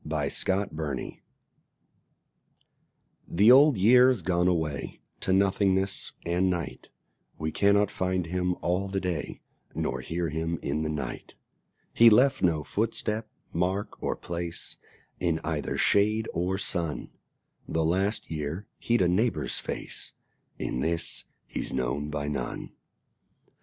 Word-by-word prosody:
The 80 0 -3
Old 70 -2 0
Year 80 -8 -2 2.1
The 105 +7 +6
Old 140 -1 +7
Year's 125 +1 +5
gone 90 0 +2
away 80 -6 -1 0.2
To - - -1
nothingness 95 0 +2
and 90 +2 +2
night: 85 -3 -4 0.5
We 80 +1 -2
cannot 100 +3 +3
find 95 -1 -1
him 90 +1 -1
all 90 +3 0
the 95 0 -1
day 90 -5 -4 0.3
Nor - - -2
hear 85 0 -2
him 80 +2 -2
in 75 +2 -1
the 80 - -1
night: 75 -2 -5 0.6
He 115 0 +8
left 130 +5 +4
no 80 -4 +2
footstep, 110 +2 -1 0.2
mark 95 +4 -1
or - - -1
place 85 -1 -5 0.4
In 85 -2 +1
either 80 -2 -2
shade 105 +2 +3
or 90 +2 0
sun: 85 -5 -2 0.6
The 80 -1 0
last 95 +6 0
year 80 +5 -3
he'd 120 -5 +2
a - - +3
neighbour's 90 - +1
face, - - -4 0.4
In - - -3
this 85 +5 -1 0.2
he's - - -4
known 65 +3 -1
by 75 -1 -3
none. 75 - -4
90 Hz, 125 wpm, -28 LUFS, 80-100 Hz, 2.1 s, He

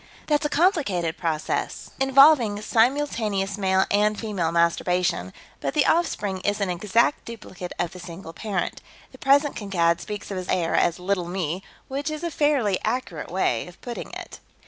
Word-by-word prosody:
That's 295 0 +1
a - - -10
complicated 275 - +1
process, 160 -2 -2
involving 270 -5 +5
simultaneous 225 -5 +1
male 190 -2 +2
and 210 +1 +2
female 195 -7 -1
masturbation, 170 - +1 0.3
but - - -3
the 295 - +4
offspring 205 - +1
is 205 +2 0
an 195 -3 0
exact 210 +9 +1
duplicate 190 -6 -8
of 175 - -1
the 180 - -10
single 170 -1 -9
parent. 205 +2 -3 0.3
The - - -15
present 280 +2 +3
Kankad 170 -5 +1
speaks 210 -1 -6
of 195 - -3
his 185 0 -5
heir 170 -2 +1
as 170 - +2
'Little 180 -1 -1
Me,' 175 -1 -2 0.3
which 280 +3 -3
is 310 +1 -5
a 340 - -2
fairly 280 -11 +2
accurate 220 -9 -3
way 170 -10 0
of 180 - -14
putting 240 -1 -6
it." - - -8
200 Hz, 165 wpm, -24 LUFS, 180-260 Hz, 0.3 s, involving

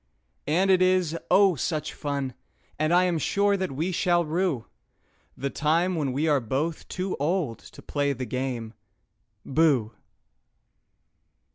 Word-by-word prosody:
And 185 +6 +3
it 185 -1 +4
is, 185 -3 +2
oh, 195 -1 +5
such 155 +1 -2
fun 140 -3 -3 0.5
I 170 +4 +4
am 175 -3 +1
sure 200 +6 +2
that 190 -4 -2
we 160 +7 -1
shall 175 0 +2
rue 160 -6 -1 0.7
The 140 +1 -3
time 165 +4 +1
when 150 -6 -1
we 145 +5 0
are 145 -3 +3
both 140 +7 -3
too 185 +1 -3
old 150 -5 -1
to - - -14
play 145 -1 0
the 130 -1 -4
game 125 -2 -3 0.7
"Booh!" 135 -7 +2
155 Hz, 135 wpm, -26 LUFS, 135-180 Hz, 0.7 s, oh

